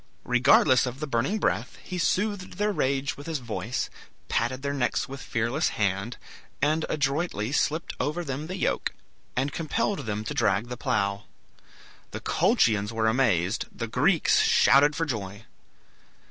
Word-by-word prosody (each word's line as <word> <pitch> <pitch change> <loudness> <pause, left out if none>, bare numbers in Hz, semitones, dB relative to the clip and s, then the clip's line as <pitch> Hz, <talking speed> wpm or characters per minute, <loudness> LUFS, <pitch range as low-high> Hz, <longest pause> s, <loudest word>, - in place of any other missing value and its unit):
Regardless 125 +1 +5
of 125 +2 -6
the 155 - -2
burning 135 - 0
breath, - - -1
he 180 -1 -5
soothed 200 +1 0
their 210 +1 0
rage 135 -6 0
with 145 - -10
his 160 -2 -1
voice, 120 -1 -3 0.4
patted 130 +3 -1
their 140 0 -1
necks 135 -3 0
with 135 0 -8
fearless 120 +8 0
hand, 100 +3 -1 0.4
and 155 +3 +1
adroitly 140 - -1
slipped 155 +3 0
over 165 +4 -1
them 145 +1 -4
the 185 +2 -5
yoke, - - -1 0.4
and 135 +3 -1
compelled 195 - -1
them 105 0 -2
to - - -4
drag 100 +5 +1
the 125 - -4
plough. 100 -3 -1 0.8
The - - -6
Colchians 105 -1 +2
were 110 0 -1
amazed; 110 -5 +1
the 115 - -4
Greeks 150 - +3
shouted 145 +3 +5
for 165 - 0
joy. 105 -5 -5
135 Hz, 150 wpm, -26 LUFS, 115-155 Hz, 0.8 s, Regardless